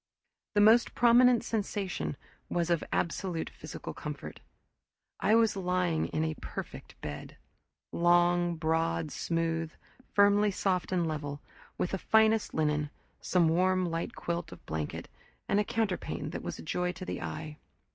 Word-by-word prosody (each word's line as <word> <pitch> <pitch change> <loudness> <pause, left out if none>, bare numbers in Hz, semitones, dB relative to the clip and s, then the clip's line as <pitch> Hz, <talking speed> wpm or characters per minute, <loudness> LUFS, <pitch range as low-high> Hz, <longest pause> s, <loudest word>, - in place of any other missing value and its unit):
The 205 - +5
most 225 +3 +5
prominent 245 0 +6
sensation 195 - -2 0.3
was 175 0 0
of 170 - +2
absolute 170 -1 -1
physical - - -8
comfort. - - -7 0.8
I 215 - +4
was 225 -2 +4
lying 180 -3 0
in 155 - -1
a 160 0 -1
perfect - - -8
bed: 75 0 -7 0.5
long, 175 0 +3
broad, 160 - 0
smooth; 165 -1 -1 0.4
firmly 205 +1 +5
soft 185 -2 -1
and 180 -2 +1
level; 145 -2 -3 0.4
with 180 - -1
the 190 - -2
finest 220 +1 +3
linen, 150 -1 +1 0.3
some 175 -3 +2
warm 185 +3 +2
light 165 -1 -3
quilt 170 -1 -3
of - - -12
blanket, 80 -1 -4 0.4
and 200 - +2
a - - +3
counterpane 210 -4 -2
that - - -5
was - - -5
a - - -9
joy 180 - -1
to 185 0 -8
the - - -4
eye. 155 -1 -6
175 Hz, 145 wpm, -30 LUFS, 160-200 Hz, 0.8 s, prominent